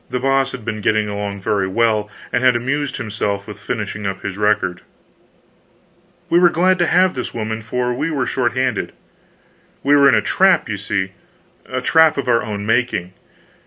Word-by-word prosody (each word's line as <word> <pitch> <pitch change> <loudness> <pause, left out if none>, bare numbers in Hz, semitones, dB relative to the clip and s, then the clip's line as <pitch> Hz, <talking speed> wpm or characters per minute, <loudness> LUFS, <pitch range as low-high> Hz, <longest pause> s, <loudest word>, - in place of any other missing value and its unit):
The 125 - -2
Boss 135 +1 +1
had 125 -4 -8
been 110 -1 -4
getting 110 +1 +1
along 100 -1 -4
very 100 -1 0
well, 105 +1 +1 0.2
and 120 - +1
had 130 -1 +5
amused 135 +3 -2
himself 105 -4 -3
with 105 -2 -10
finishing 105 -2 -4
up 95 -1 -5
his 100 - -4
record. 100 -4 0 1.5
We 170 - +4
were 175 -1 +6
glad 185 +3 +2
to 175 - +2
have 185 +1 +3
this 125 - -5
woman, 110 0 -3
for 125 +3 -2
we 145 +6 -2
were 140 -5 -1
short 125 -1 0
handed. 130 -4 -1 0.9
We 145 +1 +4
were 140 -1 +6
in - - +4
a - - +3
trap, 190 0 +3
you 110 -2 -3
see 95 -1 -2 0.6
a 130 0 -3
trap 160 +2 +4
of 140 - -2
our 115 -1 +3
own 105 -2 -5
making. 110 -5 0
115 Hz, 185 wpm, -19 LUFS, 105-135 Hz, 1.5 s, were